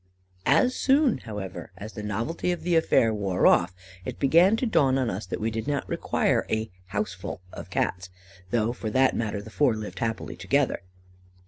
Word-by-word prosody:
"As 255 0 +4
soon, 275 -2 +3
however, 105 -4 -7
as 105 +2 -8
the 105 - -6
novelty 115 - -2
of 175 - -4
the 175 -1 +1
affair 120 -8 +3
wore 95 -4 0
off, 90 +1 +4 0.3
it - - -5
began 170 +9 +5
to 240 - -1
dawn 135 - +3
on 130 -4 0
us 95 0 -5
that - - -4
we 110 +1 -1
did 110 +3 -4
not 145 -2 -1
require - - +1
a 110 -1 -1 0.2
'house 100 -1 -2
full' 95 0 -7
of - - -8
Cats, 95 +1 -1 0.4
though 115 +1 +1
for 110 -3 -4
that 130 +4 +3
matter 105 -3 -2
the 110 - -11
four 130 -4 +2
lived 110 -1 -6
happily 110 -1 -3
together. 140 -2 0
110 Hz, 190 wpm, -26 LUFS, 105-145 Hz, 0.4 s, began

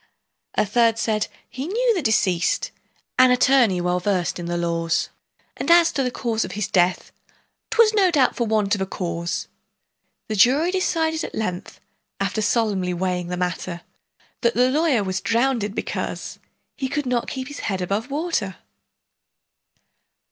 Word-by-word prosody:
A - - +2
third 230 +2 +2
said, 215 -2 0 0.2
"He 265 +4 -6
knew 470 +5 +2
the 370 - -1
deceased, 205 - +1 0.5
An 255 0 +7
attorney 250 -6 +4
well 180 0 0
versed 180 -2 -1
in 170 - -5
the 175 0 -2
laws, 165 -1 0 0.5
And - - -4
as 340 0 +6
to 275 - -1
the 255 - 0
cause 230 -3 -1
of - - -6
his 210 0 -2
death, 180 0 +1 0.6
'Twas 450 -2 +4
no 395 -3 +4
doubt 285 -7 +2
for 235 - -1
the - - -5
want 210 -2 +2
of 205 - 0
a 190 - -1
cause." 170 -2 -3 0.8
The 215 - -2
jury 275 - +4
decided 325 -4 0
at - - -6
length, 180 -5 -4 0.4
After 195 +2 -1
solemnly 205 -5 0
weighing 180 -1 -2
the 180 0 -3
matter, 180 -1 -3 0.6
That 235 -1 +2
the 250 +1 +3
lawyer 295 -6 +2
was 190 0 -2
drownded, 230 -3 0
because - - -4 0.4
He 265 - -3
could 295 0 -2
not 245 -2 -1
keep 260 -1 -5
his 290 - -8
head 190 -2 -2
above 200 +7 -2
water! 280 - -2
220 Hz, 160 wpm, -22 LUFS, 185-270 Hz, 0.8 s, An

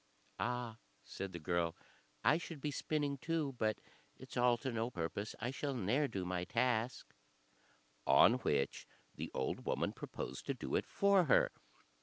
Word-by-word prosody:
"Ah!" 120 -2 -2 0.2
said 95 0 -5
the 85 - -5
girl, 85 0 0 0.5
"I 155 - +5
should 165 -3 -7
be 150 +2 -2
spinning 145 -1 -1
too, 155 -2 -1
but 110 0 +2 0.4
it's - - -10
all 120 -1 +4
to 130 +3 -3
no 115 0 -1
purpose. 100 +1 -3
I 120 +3 -1
shall 140 0 -2
ne'er 125 +7 +2
do 95 -7 -3
my 90 -1 -1
task:" 115 +4 0 0.9
on 125 +2 +7
which 70 - 0 0.3
the - - -5
old 65 - -1
woman - - 0
proposed - - -6
to - - 0
do - - -5
it - - +1
for 200 -2 +4
her. 135 - +5
120 Hz, 160 wpm, -37 LUFS, 95-140 Hz, 0.9 s, on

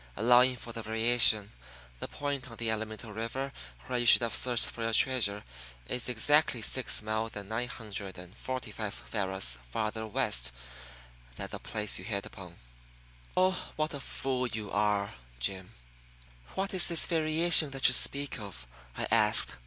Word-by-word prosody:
Allowing 125 +3 +4
for 115 -1 -10
the 115 - -5
variation, 110 -1 +3 0.5
the - - -5
point 140 -3 -5
on 115 - -11
the 115 -1 -2
Alamito 110 0 -5
River 130 +5 -4 0.3
where 125 -1 -2
you 120 - -1
should 120 - +7
have 115 - -2
searched 120 -2 +2
for 115 - -7
your 115 0 -2
treasure 110 -6 +2 0.4
is 125 0 -2
exactly 125 0 +2
six 130 0 0
miles 110 +1 -3
and 100 -1 -8
nine 115 +2 -2
hundred 105 -6 -7
and 90 +2 -12
forty 130 -2 -6
five 105 -1 -5 0.2
varas 95 - -2
farther 110 - -3
west 60 - -1 0.8
than - - -5
the - - -6
place 105 -1 -1
you - - -9
hit 100 -3 -3
upon. 90 -3 -11 0.8
Oh, 185 0 0
what 155 0 -2
a 145 - -6
fool 130 -1 -3
you 110 -3 -6
are, 105 -1 0 0.2
Jim!" 95 +10 -3 0.9
"What 195 +1 -2
is 185 -2 +6
this 170 -2 +4
variation 160 -1 +6
that 135 -1 +2
you - - +6
speak 140 -2 +2
of?" 100 -12 -8 0.3
I - - -2
asked. - - +3
115 Hz, 165 wpm, -29 LUFS, 105-130 Hz, 0.9 s, should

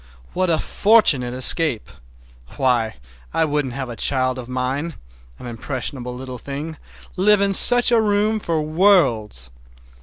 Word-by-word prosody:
What 185 -1 -1
a 165 - +2
fortunate 150 - +2
escape! 130 -1 0 0.7
Why, 120 -4 0 0.4
I 160 - +2
wouldn't 145 -4 -2
have 135 -1 -5
a 120 - -7
child 130 0 0
of 125 -1 -9
mine, 130 +6 -3 0.4
an - - -12
impressionable 125 +1 -5
little 130 -1 -8
thing, 145 +5 -7 0.4
live 210 +2 +4
in 200 0 +1
such 245 +5 +6
a 230 -2 +4
room 210 +1 0
for 165 -6 -2
worlds. 150 - +1
140 Hz, 140 wpm, -20 LUFS, 125-185 Hz, 0.7 s, such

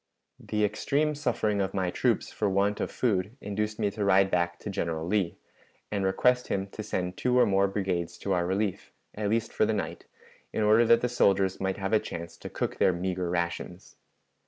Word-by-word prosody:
"The 105 0 0
extreme 150 +8 0
suffering 115 -8 0
of 95 - -2
my 95 -2 0
troops - - 0
for 105 - 0
want 100 +2 +1
of - - -1
food 105 -1 -1
induced 105 0 -3
me 105 -2 0
to 105 0 -3
ride 95 0 +4
back 85 -1 +1
to - - -5
General 85 -4 -2
Lee, 95 -2 0 0.5
and 100 -2 -1
request 125 +6 +2
him 95 -1 -1
to 110 - -7
send 90 -3 -3
two 125 0 +1
or 125 - +6
more 100 0 +3
brigades 95 -4 -2
to 100 - 0
our 90 -1 +1
relief, 95 +1 -2 0.2
at 105 -1 -2
least 115 +1 0
for 110 - +2
the 110 - +1
night, 100 - -4 0.5
in 110 - -1
order 110 +3 +5
that 115 +1 +5
the 125 - +1
soldiers 95 -5 +2
might 95 0 -1
have 95 +1 -2
a 110 - +6
chance 85 -3 -7
to - - -8
cook - - -3
their 95 - +4
meager 90 0 -2
rations. 85 +1 -3
100 Hz, 205 wpm, -28 LUFS, 95-110 Hz, 0.5 s, or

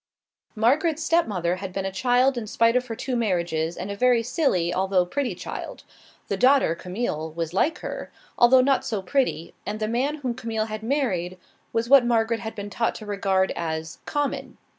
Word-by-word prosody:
Margaret's 290 +8 +2
stepmother 190 - +1
had 190 0 -6
been 195 +1 -3
a 195 - -2
child 250 +6 +2
in 235 -3 -4
spite 230 +2 +2
of 250 0 +1
her 225 - -4
two 255 +2 -3
marriages, 170 -7 -1
and 190 +3 -4
a - - -4
very 245 +1 +3
silly, 225 - +1
although 190 -1 +2
pretty 245 +1 -2
child. - - -7 0.4
The - - -2
daughter, 265 - +4
Camille, 170 -3 -4
was 165 0 -4
like 285 - +1
her, - - -6 0.2
although 255 +2 +6
not 270 +1 +2
so 210 -4 -3
pretty, 220 - -1
and 210 +1 -4
the 215 - -1
man 255 +6 0
whom 245 - 0
Camille 225 -3 -2
had 215 -1 -6
married 215 -9 -1 0.3
was 230 +1 0
what 275 0 +7
Margaret 230 -1 +1
had 220 -1 -6
been 205 0 -6
taught 230 +4 0
to 215 - -8
regard 195 -2 +1
as 160 -1 -4
"common." 290 -1 -2
220 Hz, 185 wpm, -25 LUFS, 185-250 Hz, 0.4 s, what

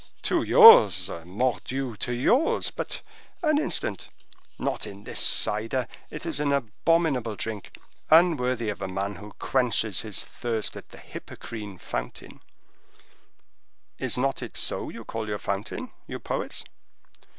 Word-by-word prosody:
"To - - +2
yours, 470 0 +8
mordioux, 125 +5 -2
to 120 - -3
yours. 235 - +2
But—an 310 -4 -3
instant—not 110 - -4
in 100 0 -10
this - - -5
cider. 115 +5 +2 0.2
It 150 +2 -7
is 160 -3 -2
an 145 -1 +1
abominable 140 -1 +1
drink, 105 -1 -6 0.3
unworthy 130 -9 +4
of 105 - -5
a 95 - -2
man 95 +1 -3
who 105 +3 -11
quenches 115 -7 +1
his 105 -3 -3
thirst 115 -3 -3
at - - -10
the - - -14
Hippocrene 105 -4 -9
fountain—is - - -7 1.7
not 135 +1 0
it 120 -5 -4
so - - +1
you - - -9
call 110 -1 -5
your 105 -1 -2
fountain, 100 0 -4 0.2
you - - -5
poets?" - - -4
120 Hz, 125 wpm, -26 LUFS, 105-140 Hz, 1.7 s, yours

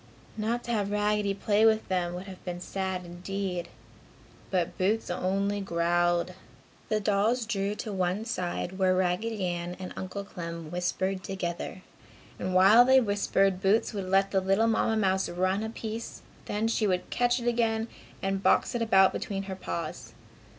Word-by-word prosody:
Not 225 +3 -1
to 240 - -4
have 205 -3 0
Raggedy 210 -1 +1
play 205 +1 +2
with 220 -1 +4
them 180 -2 -1
would 180 - -5
have 190 -2 -11
been 175 -1 -5
sad, 190 0 -3
indeed. 180 0 -4 0.8
But 180 -3 0
Boots 205 +2 0
only 195 +3 0
growled. 175 -1 +1 0.6
The 215 -1 +2
dolls 215 +4 +1
drew 205 -2 -1
to 215 -1 -5
one 185 +3 -1
side, 185 -3 -3
where 185 -1 +3
Raggedy 185 +3 0
Ann 175 0 -3
and 185 -1 -7
Uncle 195 +2 -5
Clem 170 -4 -7
whispered 185 +2 -1
together. 185 0 -4 0.6
And 185 0 -2
while 200 +6 +8
they 260 +1 +6
whispered 195 -4 +1
Boots 205 +4 +2
would 195 -3 -4
let 195 +1 +3
the 190 - +2
little 195 +4 +2
Mamma 225 0 +2
mouse 190 -2 +1
run 185 +3 0
a 220 - -3
piece, 225 0 -6 0.2
then 210 +2 -1
she 225 -1 +1
would 180 -2 -1
catch 245 +1 +2
it 240 - -4
again 230 -1 +1 0.4
and 195 0 0
box - - +3
it 240 - -1
about 195 -4 +5
between 195 -2 -3
her 190 -1 -5
paws. 85 - -5
195 Hz, 165 wpm, -28 LUFS, 185-215 Hz, 0.8 s, while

